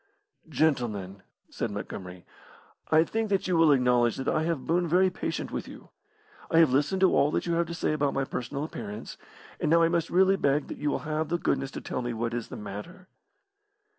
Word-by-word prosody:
"Gentlemen," 120 -11 0 0.3
said 115 - -3
Montgomery, 90 -3 -7 0.7
"I 160 0 +6
think 225 +5 -2
that 195 -2 0
you 180 - +1
will 165 -2 +5
acknowledge 125 -3 +3
that 135 - -4
I 155 - +2
have 165 -6 -2
boon 175 +1 +1
very 185 +3 +3
patient 180 - -4
with - - -4
you. - - -12 0.6
I 165 - +2
have 160 -6 +5
listened 150 +8 +1
to 190 - +5
all 145 - +4
that - - -1
you 170 - 0
have 170 0 +1
to 170 - -5
say 165 - 0
about 145 -2 0
my 135 - +1
personal 135 +2 -4
appearance, 105 -8 -7 0.4
and - - 0
now 165 +1 +5
I 165 - +4
must 170 -1 0
really 190 +2 +4
beg 140 -2 +1
that - - -7
you 150 - 0
will 145 - -3
have 155 0 -2
the 175 - +1
goodness 135 -5 -1
to - - -7
tell - - -4
me 120 -1 -3
what 115 +1 -2
is 120 -1 -3
the - - -8
matter." 170 - -9
150 Hz, 215 wpm, -28 LUFS, 120-170 Hz, 0.7 s, I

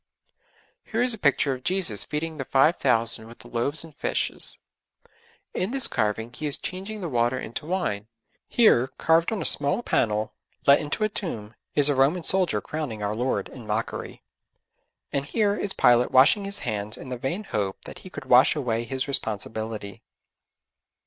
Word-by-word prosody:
Here 230 +1 -1
is 250 -1 +3
a - - -5
picture 140 -2 +2
of 130 - -7
Jesus 180 - +1
feeding 160 +1 -4
the 135 - -4
five 140 +7 +3
thousand 115 -3 +2
with 115 - -13
the - - -14
loaves 130 +7 -1
and 160 -3 -13
fishes; - - -1 1.0
in 185 - -1
this 265 0 +3
carving 110 +3 -1
He 150 - -4
is 145 - +1
changing 195 +3 -6
the 175 - -3
water 120 -2 +1
into 125 +4 -6
wine; 110 - -2 0.4
here, 170 - +4
carved 165 +3 +3
on 220 - -2
a - - -6
small 145 +11 +3
panel, 105 - 0 0.3
let 140 0 +7
into 150 +8 -2
a 215 - +2
tomb, 115 - -5 0.2
is 145 -1 +4
a 145 - +4
Roman 140 +6 +2
soldier 185 -1 +2
crowning 140 -9 -5
our 105 +1 -1
Lord 125 +4 -1
in 120 -4 -11
mockery; 110 +2 -4 0.9
and 140 - 0
here 205 +6 +1
is 200 - -3
Pilate 120 0 +4
washing 140 +11 +5
his 200 +1 -3
hands 105 -2 -2
in 130 - -9
the 125 - -3
vain 170 - -3
hope 100 - -3
that - - -9
he 185 - -11
could 145 -6 -9
wash 130 +2 +6
away 120 -5 -1
his 130 +2 -3
responsibility. 110 -4 -3
135 Hz, 175 wpm, -25 LUFS, 115-175 Hz, 1.0 s, let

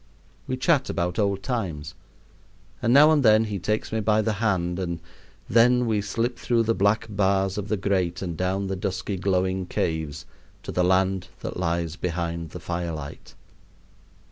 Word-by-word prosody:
We 130 - -2
chat 140 0 +2
about 90 +3 -1
old 100 -2 0
times; 85 - -3 0.9
and 115 - +2
now 145 +4 +7
and 155 -2 +4
then 110 -3 +5
he 105 -3 -3
takes 105 +4 -2
me 110 - 0
by 110 0 +2
the 110 - 0
hand, 90 -5 0
and 85 -2 -3 0.5
then 125 +3 +4
we 110 -3 +1
slip 115 +5 -2
through 115 -1 +2
the 115 +1 +1
black 110 +2 +2
bars 95 -2 +1
of 105 -1 -4
the 105 0 0
grate 95 -2 0
and 85 -3 -4
down 95 +3 -1
the 95 0 -2
dusky 95 +1 -3
glowing 95 0 0
caves 80 -4 -2 0.4
to - - -5
the 90 - +1
land 95 0 +2
that - - -5
lies 85 -1 -1
behind 85 -1 -3
the - - -8
firelight. 85 -4 -5
95 Hz, 170 wpm, -25 LUFS, 90-110 Hz, 0.9 s, now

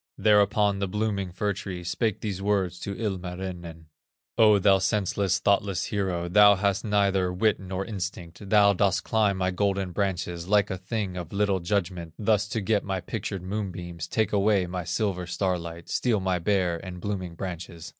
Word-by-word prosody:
Thereupon 105 -1 +3
the 100 - -1
blooming 100 -2 -2
fir 100 +3 -1
tree 95 -2 -6
Spake 105 +4 -1
these 100 -3 -3
words 95 -3 0
to 100 - -5
Ilmarinen: 90 -5 -5 0.5
"O 105 -2 +6
thou 95 0 +4
senseless, 100 -2 +1
thoughtless 100 0 +1
hero, 95 -4 -2
Thou 105 +3 +7
hast 100 0 0
neither 100 -3 +2
wit 105 +4 +1
nor 95 0 -4
instinct; 95 -2 -6
Thou 100 -1 +6
dost 95 0 +1
climb 105 -3 +1
my 95 0 0
golden 95 0 0
branches, 90 -3 -2
Like 105 0 +3
a 95 - -4
thing 95 -1 -3
of 85 -2 -6
little 100 -1 +1
judgment, 85 -3 -2
Thus 105 -1 +1
to 110 0 -2
get 105 0 +1
my 95 -1 -2
pictured 95 0 -5
moonbeams, 90 -4 -5
Take 110 -3 0
away 100 -2 +3
my 90 -1 -5
silver 90 -1 -1
starlight, 85 -3 -3
Steal 115 -4 +1
my 95 -1 0
Bear 90 -2 0
and 90 -2 -7
blooming 95 -3 -4
branches." 85 -2 -6
95 Hz, 165 wpm, -26 LUFS, 90-105 Hz, 0.5 s, Thou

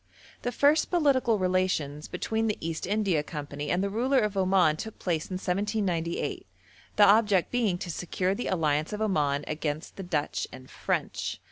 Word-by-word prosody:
The 245 - -2
first 290 +5 +3
political 270 -9 +3
relations 180 -6 0
between 225 0 -1
the 210 - -1
East 165 0 -4
India 200 -6 +1
Company 145 -1 -6
and 180 +2 +1
the 200 - 0
ruler 255 +6 +1
of 210 -5 +1
Oman 185 -4 +3
took 220 +6 -7
place 165 -4 -1
in 185 - -3
1798, 185 -3 -1 0.5
the 205 - +7
object 205 -3 +4
being 225 -7 +1
to 175 - -5
secure 180 +3 -1
the 245 - -3
alliance 155 -2 0
of 210 - -4
Oman 145 -8 +1
against 155 0 -4
the - - -5
Dutch 165 -6 -2
and 130 0 -12
French. - - -2
185 Hz, 165 wpm, -28 LUFS, 155-215 Hz, 0.5 s, the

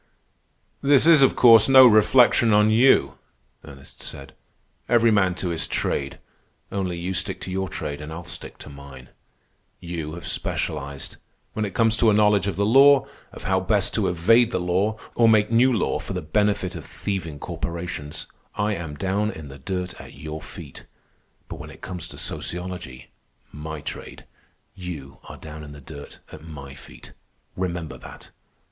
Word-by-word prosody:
"This 140 0 +4
is, 165 -3 +7
of 135 - +5
course, 115 -1 +7
no 130 -1 +9
reflection 115 0 +5
on 105 +1 +4
you," 110 - +4 0.4
Ernest 70 -1 -13
said. 70 -1 -8 0.6
"Every 115 -1 +4
man 95 -4 +2
to 90 - -2
his 80 -1 -2
trade. 70 0 -2 0.5
Only 95 -3 -2
you 90 +2 -3
stick 95 +2 -3
to 95 - -6
your 95 0 -2
trade, 75 -1 -5
and 75 +1 -8
I'll 85 +2 -7
stick 90 +1 -8
to - - -11
mine. 70 -2 -12 0.7
You 85 -3 -6
have 85 - -9
specialized. 70 -2 -4 0.4
When 110 - -1
it 100 - -7
comes 115 -1 +3
to 115 - +4
a 105 - +3
knowledge 105 -2 +3
of 100 - -2
the 100 - 0
law, 135 +4 +6 0.3
of - - -11
how - - +1
best - - +1
to - - +1
evade 110 +8 +4
the 105 - -2
law 95 +5 0 0.2
or 115 -1 +4
make 110 0 +3
new 125 +3 +4
law 115 - 0
for - - -6
the - - -3
benefit 95 +2 0
of 80 - -7
thieving 90 -7 -5
corporations, 85 -1 -6 0.3
I 105 0 0
am 85 -6 -6
down 100 +5 -1
in 80 -8 -8
the 70 0 -11
dirt 90 +5 -5
at - - -13
your 75 +2 -7
feet. 80 -3 -11 0.6
But - - -8
when - - -9
it - - -14
comes 90 -3 -5
to - - -10
sociology—my 80 -2 -6
trade—you 80 -5 -10
are - - -10
down 75 0 -10
in 75 -1 -10
the 75 - -11
dirt 70 +1 -11
at - - -11
my 70 -4 -10
feet. - - -14 0.4
Remember 85 -3 -4
that. - - -13
90 Hz, 170 wpm, -23 LUFS, 75-105 Hz, 0.7 s, no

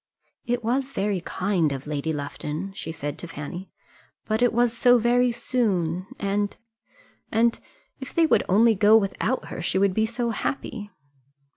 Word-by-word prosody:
"It 245 0 -1
was 260 +4 -1
very 195 -2 -1
kind 180 -4 0
of 135 -1 -5
Lady 150 +1 -2
Lufton," 150 +5 -5
she 160 - -5
said 145 -3 -5
to 175 - -7
Fanny; 165 +4 -7 0.6
"but 220 +1 -1
it 245 - +4
was 240 0 +2
so 245 +1 +5
very 245 +1 +3
soon, 190 -8 -1
and 200 0 -1 0.7
and 230 +1 +3
and - - -20 0.4
if 265 - -7
they 335 - +3
would - - +4
only 225 +5 +5
go 210 +2 +6
without 220 +4 -1
her, - - -5
she 175 - 0
would 195 -1 +3
be 220 +3 +1
so 235 +1 -2
happy." 220 -3 -4
205 Hz, 165 wpm, -25 LUFS, 175-235 Hz, 0.7 s, go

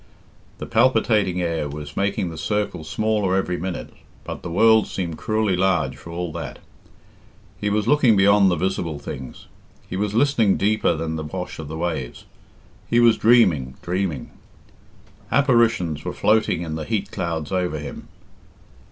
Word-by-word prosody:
The - - -6
palpitating 110 -6 +2
air 80 -3 -2
was 75 0 -8
making 100 -3 -1
the - - -8
circle 105 -5 -2
smaller 105 +1 0
every 95 -2 0
minute, 90 0 -5 0.3
but - - -7
the 90 - -6
world 110 +5 +4
seem 90 -4 -4
cruelly 110 +3 0
large 90 -8 +1
for 75 - -12
all 85 0 -4
that. 85 +1 -6 1.0
He 105 - -1
was 105 0 0
looking 135 -7 +4
beyond 100 0 +5
the 90 - +1
visible 85 -5 -2
things; 65 -3 -8 0.4
he - - -5
was 105 +2 -2
listening 115 -6 +3
deeper 105 -4 +2
than 80 0 -3
the 80 - -4
wash 90 +3 -6
of 80 - -6
the 80 +2 -6
waves; 80 -7 -4 0.6
he 120 - +3
was 120 -2 +6
dreaming, 90 - +3
dreaming. 90 -6 -2 1.0
Apparitions 115 - +2
were - - -4
floating 105 -5 +2
in 80 -2 -5
the 80 -1 -4
heat 100 +5 -2
clouds 80 -3 -3
over 90 -4 -1
him. 75 -1 -8
90 Hz, 155 wpm, -22 LUFS, 80-105 Hz, 1.0 s, was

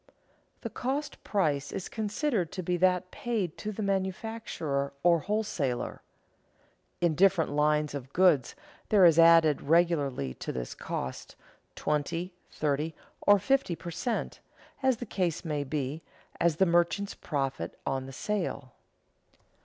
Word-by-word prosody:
The - - -5
cost 280 +4 -3
price 145 -9 0
is 195 - -4
considered 215 - -1
to 185 - -4
be 180 +1 0
that 180 0 +2
paid 215 -9 -2
to 215 - -3
the 215 +1 -4
manufacturer 190 -7 -2
or 170 -1 +5
wholesaler. 165 - -2 1.0
In 170 -2 +3
different 185 -1 +3
lines 150 0 +2
of 135 -2 -6
goods 165 -8 +3 0.3
there 200 -4 +6
is 165 -1 +6
added 165 -3 +6
regularly 145 - +2
to - - -5
this 60 -1 -5
cost 65 - -5 0.4
twenty, 165 +5 -2 0.2
thirty, 150 +1 -1 0.3
or 205 0 +8
fifty 270 -3 +1
per 170 +1 -7
cent., 230 +7 -3 0.4
as 260 -3 +3
the 245 - -6
case 180 -5 -2
may 150 -3 -1
be, 145 +2 -3 0.4
as 170 -2 +3
the 190 - +4
merchant's 175 +3 +1
profit 135 -4 -3
on 135 -1 -2
the - - -8
sale. 140 - -3
170 Hz, 135 wpm, -29 LUFS, 145-195 Hz, 1.0 s, or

